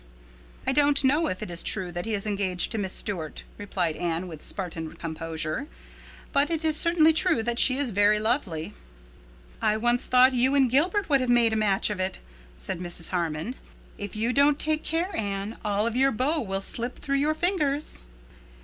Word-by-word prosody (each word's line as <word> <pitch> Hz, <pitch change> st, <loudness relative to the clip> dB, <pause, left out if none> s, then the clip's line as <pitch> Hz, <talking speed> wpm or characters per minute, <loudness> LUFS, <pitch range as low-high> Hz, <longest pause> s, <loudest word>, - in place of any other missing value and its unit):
"I -, -, +1 dB
don't 285 Hz, 0 st, +3 dB
know 295 Hz, +5 st, +3 dB
if 185 Hz, -, -4 dB
it -, -, -6 dB
is 170 Hz, -, -3 dB
true 185 Hz, -4 st, -1 dB
that 175 Hz, +4 st, -5 dB
he 220 Hz, -, 0 dB
is 200 Hz, -, -3 dB
engaged 195 Hz, -4 st, +1 dB
to 225 Hz, -, -1 dB
Miss 190 Hz, -2 st, -2 dB
Stuart," 175 Hz, -8 st, -3 dB, 0.2 s
replied 175 Hz, -5 st, -2 dB
Anne, 170 Hz, +1 st, -2 dB
with 160 Hz, -3 st, -10 dB
Spartan 165 Hz, -4 st, -5 dB
composure, 160 Hz, -1 st, -4 dB, 0.7 s
"but 285 Hz, +2 st, +3 dB
it 325 Hz, -1 st, -2 dB
is 310 Hz, -1 st, +2 dB
certainly 320 Hz, 0 st, +4 dB
true 320 Hz, -7 st, +3 dB
that 240 Hz, +1 st, -1 dB
she 260 Hz, 0 st, +5 dB
is 280 Hz, -4 st, 0 dB
very 205 Hz, +1 st, +3 dB
lovely." 215 Hz, -, -1 dB, 0.9 s
"I 215 Hz, -, +2 dB
once 240 Hz, +3 st, +1 dB
thought 255 Hz, +1 st, +5 dB
you 255 Hz, +3 st, +3 dB
and 265 Hz, -4 st, +3 dB
Gilbert 350 Hz, +10 st, +2 dB
would 275 Hz, -3 st, +3 dB
have 255 Hz, -, -1 dB
made 235 Hz, -2 st, +4 dB
a -, -, +1 dB
match 210 Hz, -1 st, +1 dB
of 205 Hz, -, -4 dB
it," 185 Hz, 0 st, -2 dB, 0.4 s
said -, -, -5 dB
Mrs. 175 Hz, -2 st, -1 dB
Harmon. 170 Hz, +4 st, -2 dB, 0.5 s
"If 205 Hz, 0 st, -6 dB
you 230 Hz, +3 st, 0 dB
don't 280 Hz, +1 st, +4 dB
take 310 Hz, 0 st, -1 dB
care, 335 Hz, +3 st, -2 dB
Anne, 200 Hz, +1 st, -3 dB
all 205 Hz, +1 st, 0 dB
of 230 Hz, 0 st, -2 dB
your 270 Hz, +2 st, +3 dB
beaux 285 Hz, +7 st, 0 dB
will 195 Hz, -4 st, -3 dB
slip 240 Hz, +5 st, -4 dB
through 275 Hz, -1 st, -1 dB
your 300 Hz, +3 st, +1 dB
fingers." 305 Hz, -, 0 dB
225 Hz, 195 wpm, -26 LUFS, 185-280 Hz, 0.9 s, she